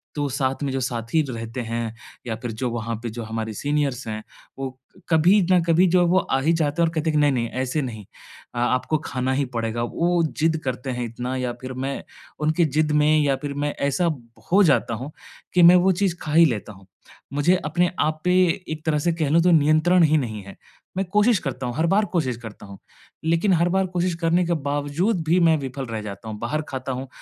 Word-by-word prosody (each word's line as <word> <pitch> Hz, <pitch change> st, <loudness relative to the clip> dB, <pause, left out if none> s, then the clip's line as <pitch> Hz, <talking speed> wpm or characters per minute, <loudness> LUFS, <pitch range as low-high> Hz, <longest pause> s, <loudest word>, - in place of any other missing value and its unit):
तो 145 Hz, -1 st, -1 dB
साथ 135 Hz, 0 st, -1 dB
में 135 Hz, -, -1 dB
जो 135 Hz, -, -1 dB
साथी 120 Hz, +5 st, -1 dB
रहते 115 Hz, +1 st, -5 dB
हैं 115 Hz, -1 st, -3 dB, 0.3 s
या 110 Hz, -, -2 dB
फिर 120 Hz, -2 st, -4 dB
जो 120 Hz, +3 st, -3 dB
वहाँ 115 Hz, 0 st, -3 dB
पे 120 Hz, -, -3 dB
जो 115 Hz, +1 st, -6 dB
हमारे 110 Hz, 0 st, -4 dB
सीनियर्स 140 Hz, -1 st, -1 dB
हैं, 110 Hz, 0 st, -5 dB, 0.4 s
वो 130 Hz, -1 st, -5 dB, 0.3 s
कभी 175 Hz, +6 st, +5 dB
न 180 Hz, -, +5 dB
कभी 170 Hz, +3 st, +4 dB
जो 180 Hz, +1 st, +3 dB
है 175 Hz, -, +3 dB
वो 185 Hz, +2 st, +4 dB
आ 135 Hz, -, 0 dB
ही 165 Hz, +4 st, +2 dB
जाते 160 Hz, 0 st, 0 dB
हैं 165 Hz, -, +4 dB
और 165 Hz, -, -4 dB
कहते 160 Hz, +1 st, 0 dB
हैं 155 Hz, -, -1 dB
कि -, -, +4 dB
नहीं-नहीं 125 Hz, -5 st, +1 dB
ऐसे 130 Hz, +4 st, -1 dB
नहीं। 110 Hz, -5 st, -6 dB, 0.5 s
अ -, -, -2 dB
आपको 130 Hz, +5 st, +1 dB
खाना 130 Hz, +1 st, -1 dB
ही 140 Hz, +1 st, 0 dB
पड़ेगा। 115 Hz, +1 st, -1 dB
वो 170 Hz, +7 st, +1 dB, 0.2 s
ज़िद 160 Hz, +1 st, +2 dB
करते 130 Hz, +1 st, -3 dB
हैं 125 Hz, -1 st, -3 dB
इतना 125 Hz, +3 st, -4 dB
या 125 Hz, -1 st, -2 dB
फ़िर 130 Hz, 0 st, -6 dB
मैं 135 Hz, +2 st, -4 dB, 0.4 s
उनकी 155 Hz, +2 st, +2 dB
ज़िद 155 Hz, +1 st, 0 dB
में 155 Hz, +1 st, +4 dB
या 140 Hz, -2 st, +2 dB
फिर 145 Hz, -, -3 dB
मैं 145 Hz, -, -1 dB
ऐसा 170 Hz, +4 st, +1 dB
ब 135 Hz, -7 st, -5 dB, 0.3 s
हो 200 Hz, +2 st, +6 dB
जाता 140 Hz, -7 st, +2 dB
हूँ 130 Hz, +6 st, -7 dB, 0.4 s
कि 180 Hz, -, +5 dB
मैं 175 Hz, +1 st, +9 dB
वो 180 Hz, +1 st, +4 dB
चीज़ 185 Hz, -1 st, 0 dB
खा 150 Hz, -, -4 dB
ही 165 Hz, +1 st, +7 dB
लेता 110 Hz, -5 st, -2 dB
हूँ। 95 Hz, 0 st, -18 dB, 0.5 s
मुझे 145 Hz, +6 st, +3 dB
अपने 175 Hz, +4 st, +1 dB
आप 155 Hz, 0 st, 0 dB
पे 180 Hz, -, +3 dB, 0.4 s
एक 155 Hz, 0 st, -6 dB
तरह 150 Hz, -2 st, +1 dB
से 170 Hz, +2 st, +1 dB
कह 155 Hz, -4 st, -1 dB
लूँ 165 Hz, +2 st, +4 dB
तो 180 Hz, -, +4 dB
नियंत्रण 155 Hz, +3 st, +4 dB
ही 155 Hz, 0 st, +4 dB
नहीं 110 Hz, -7 st, -3 dB
है। 100 Hz, -, -11 dB, 0.4 s
मैं 195 Hz, -, 0 dB
कोशिश 210 Hz, 0 st, +4 dB
करता 135 Hz, -3 st, -4 dB
हूँ, 120 Hz, -, -4 dB
हर 160 Hz, +4 st, +1 dB
बार 205 Hz, +4 st, +3 dB
कोशिश 130 Hz, -9 st, 0 dB
करता 110 Hz, -3 st, -10 dB
हूँ। 100 Hz, -1 st, -11 dB, 0.5 s
लेकिन 170 Hz, +4 st, +2 dB
हर 170 Hz, +1 st, +2 dB
बार 190 Hz, +1 st, +1 dB
कोशिश 175 Hz, -1 st, 0 dB
करने 170 Hz, +2 st, +2 dB
के 170 Hz, -, 0 dB
बावजूद 145 Hz, +7 st, -1 dB
भी 175 Hz, +3 st, +4 dB
मैं 165 Hz, -2 st, +4 dB
विफ़ल 135 Hz, 0 st, -5 dB
रह 110 Hz, -1 st, -4 dB
जाता 105 Hz, +1 st, -8 dB
हूँ, 105 Hz, -, -6 dB
बाहर 120 Hz, +7 st, -2 dB
खाता 130 Hz, 0 st, -4 dB
हूँ। 130 Hz, +1 st, -5 dB
145 Hz, 230 wpm, -23 LUFS, 120-165 Hz, 0.5 s, मैं